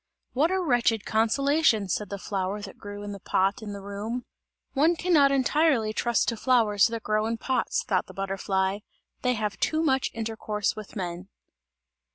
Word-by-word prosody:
"What 295 Hz, +6 st, +3 dB
a 380 Hz, +1 st, +1 dB
wretched 240 Hz, -, +1 dB
consolation!" 230 Hz, 0 st, +2 dB
said 205 Hz, +2 st, -2 dB
the 200 Hz, -, -4 dB
flower, 195 Hz, 0 st, -3 dB
that 195 Hz, -, -9 dB
grew 205 Hz, 0 st, -8 dB
in 205 Hz, -, -5 dB
the 200 Hz, -, -7 dB
pot 195 Hz, +5 st, 0 dB
in 210 Hz, -2 st, -6 dB
the 200 Hz, -1 st, -7 dB
room. 210 Hz, +5 st, -4 dB, 0.5 s
"One 315 Hz, +5 st, +3 dB
can 355 Hz, +2 st, 0 dB
not 280 Hz, -3 st, +6 dB
entirely 275 Hz, -4 st, +2 dB
trust 235 Hz, +1 st, +1 dB
to 230 Hz, -, -3 dB
flowers 220 Hz, -5 st, +3 dB
that 230 Hz, -1 st, -5 dB
grow 215 Hz, +1 st, +1 dB
in 230 Hz, 0 st, -2 dB
pots," 270 Hz, -, -1 dB
thought -, -, 0 dB
the -, -, -11 dB
butterfly, 195 Hz, 0 st, -1 dB, 0.4 s
"they 250 Hz, -1 st, +2 dB
have 210 Hz, -2 st, -3 dB
too 315 Hz, +1 st, +1 dB
much 265 Hz, -4 st, +2 dB
intercourse 220 Hz, -2 st, -2 dB
with 215 Hz, -2 st, -9 dB
men." 180 Hz, -1 st, -5 dB
220 Hz, 180 wpm, -27 LUFS, 200-265 Hz, 0.5 s, not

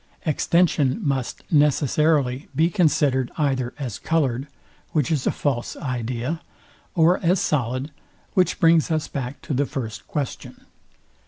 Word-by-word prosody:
Extension 155 Hz, -3 st, +2 dB
must 135 Hz, -3 st, -2 dB
necessarily 145 Hz, -2 st, +2 dB
be 160 Hz, +4 st, +3 dB
considered 145 Hz, -8 st, +2 dB
either 130 Hz, -5 st, 0 dB
as 125 Hz, -9 st, -5 dB
coloured, 140 Hz, -5 st, 0 dB, 0.5 s
which 150 Hz, -1 st, +1 dB
is 145 Hz, -5 st, 0 dB
a -, -, +3 dB
false 130 Hz, -5 st, -2 dB
idea; 125 Hz, +4 st, -3 dB
I -, -, -15 dB
or 170 Hz, +3 st, +5 dB
as 180 Hz, +2 st, +2 dB
solid, 130 Hz, 0 st, -1 dB, 0.4 s
which 185 Hz, -2 st, +2 dB
brings 165 Hz, -1 st, +4 dB
us 155 Hz, -2 st, 0 dB
back 135 Hz, -1 st, -5 dB
to -, -, -3 dB
the 140 Hz, +2 st, +1 dB
first 115 Hz, -7 st, -5 dB
question. 145 Hz, -4 st, -5 dB
145 Hz, 135 wpm, -23 LUFS, 130-160 Hz, 0.5 s, or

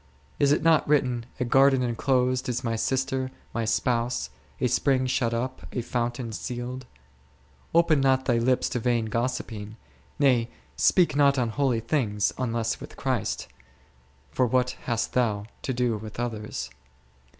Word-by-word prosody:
Is 140 Hz, 0 st, +4 dB
it 145 Hz, -, +2 dB
not 160 Hz, -2 st, +4 dB
written, 125 Hz, -5 st, +1 dB
a 125 Hz, -, 0 dB
garden 135 Hz, +1 st, +4 dB
enclosed 125 Hz, +1 st, +1 dB
is 125 Hz, +2 st, -2 dB
My 115 Hz, -1 st, -1 dB
sister, 130 Hz, +2 st, -1 dB, 0.2 s
My 115 Hz, -1 st, -1 dB
spouse; 115 Hz, -, 0 dB, 0.3 s
a -, -, +1 dB
spring 130 Hz, +1 st, +2 dB
shut 125 Hz, -2 st, 0 dB
up, 125 Hz, +3 st, -3 dB
a 125 Hz, -, -2 dB
fountain 120 Hz, 0 st, -2 dB
sealed 125 Hz, +3 st, -5 dB
P 70 Hz, -, -28 dB, 0.8 s
Open 165 Hz, -4 st, +4 dB
not 130 Hz, -1 st, +3 dB
thy 120 Hz, -2 st, +2 dB
lips 125 Hz, +2 st, +2 dB
to 125 Hz, -, -2 dB
vain 120 Hz, -1 st, +1 dB
gossiping: 110 Hz, -2 st, -3 dB, 0.4 s
nay, 125 Hz, -5 st, +3 dB, 0.3 s
speak 175 Hz, -7 st, +3 dB
not 140 Hz, -1 st, +4 dB
on 120 Hz, -3 st, +1 dB
holy 125 Hz, -1 st, 0 dB
things, 110 Hz, -5 st, 0 dB
unless 115 Hz, -2 st, -1 dB
with -, -, -10 dB
Christ; 130 Hz, -6 st, -2 dB, 0.8 s
for 125 Hz, +9 st, +2 dB
what 125 Hz, +1 st, +2 dB
hast 115 Hz, -2 st, -1 dB
thou 110 Hz, -5 st, +1 dB, 0.2 s
to -, -, -2 dB
do 125 Hz, -2 st, 0 dB
with 110 Hz, +2 st, -9 dB
others 105 Hz, -, -4 dB
125 Hz, 150 wpm, -26 LUFS, 115-130 Hz, 0.8 s, Is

